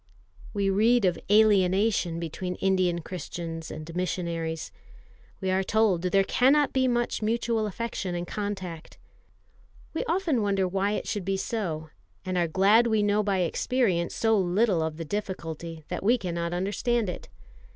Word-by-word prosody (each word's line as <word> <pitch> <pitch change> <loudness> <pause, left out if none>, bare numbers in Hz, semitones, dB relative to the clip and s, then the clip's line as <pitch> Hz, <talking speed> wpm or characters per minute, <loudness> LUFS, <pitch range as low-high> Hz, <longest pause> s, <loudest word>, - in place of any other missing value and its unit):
We 200 -1 0
read 220 +3 +4
of 175 -2 +1
alienation 200 -3 +3
between 180 +2 -4
Indian 185 -3 +1
Christians 165 -1 -6
and 155 +2 -8
missionaries. 170 -3 -3 0.7
We 190 -2 -1
are 190 +1 +2
told 205 -3 +2
there 195 +2 +3
cannot 275 +7 +3
be 260 -1 +2
much 240 -2 0
mutual 225 0 0
affection 205 -3 -4
and 175 0 -3
contact. 190 -5 -5 1.0
We 320 - -1
often 335 - +1
wonder 195 -2 +1
why 195 +3 0
it - - -3
should 205 -3 -2
be 195 +1 -1
so, 165 -8 -3 0.3
and 185 0 -2
are 175 -1 +2
glad 200 +8 +4
we 220 -2 +2
know 205 +1 +2
by 195 -3 0
experience 180 -1 0
so 225 -1 +2
little 190 0 +2
of 160 -1 -2
the 165 - -5
difficulty, 165 -4 -5
that 180 - -3
we 235 +6 +3
cannot 170 -4 -3
understand 205 +5 0
it. 180 - -6
190 Hz, 150 wpm, -27 LUFS, 175-215 Hz, 1.0 s, read